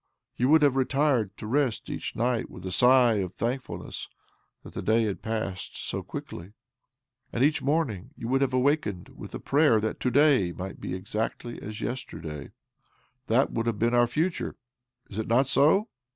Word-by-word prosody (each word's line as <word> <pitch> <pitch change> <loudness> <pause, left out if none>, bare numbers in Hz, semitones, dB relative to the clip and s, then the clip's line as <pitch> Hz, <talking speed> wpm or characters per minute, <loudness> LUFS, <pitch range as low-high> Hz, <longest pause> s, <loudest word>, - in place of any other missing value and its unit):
Yon 125 +2 +1
would 155 0 +6
have 140 -2 +4
retired 135 -5 +1
to - - -7
rest 130 0 0
each - - -5
night 120 0 0
with 90 - -10
a 95 - -3
sigh 125 +2 +5
of 95 -2 -2
thankfulness 125 +5 -4 0.5
that - - -11
the - - -4
day 115 +1 +3
had 105 -3 -2
passed 110 -4 -4
so - - -3
quickly; 90 +5 -8 0.8
and 120 - 0
each 150 +2 +3
morning 130 - 0
you 115 - -5
would 135 +2 +2
have 135 - +3
OBLOMOV 140 +4 +3
227 90 -4 -5
awakened - - -18
with - - -8
a - - -4
prayer 145 -5 +4
that 110 0 -2
to 125 - +1
day 130 - +4
might 95 +2 -7
be 90 - -3
exactly 110 +5 -4
as 110 +1 -7
yesterday. 80 - -5 0.8
Thai 120 +4 +4
would 115 0 -2
have 115 -3 0
been 115 +3 +1
our 120 0 +5
future. 160 +8 -1 0.5
Is 100 - -6
it 110 - -2
not 120 +4 +4
so? 155 - +4
120 Hz, 185 wpm, -27 LUFS, 105-135 Hz, 0.8 s, would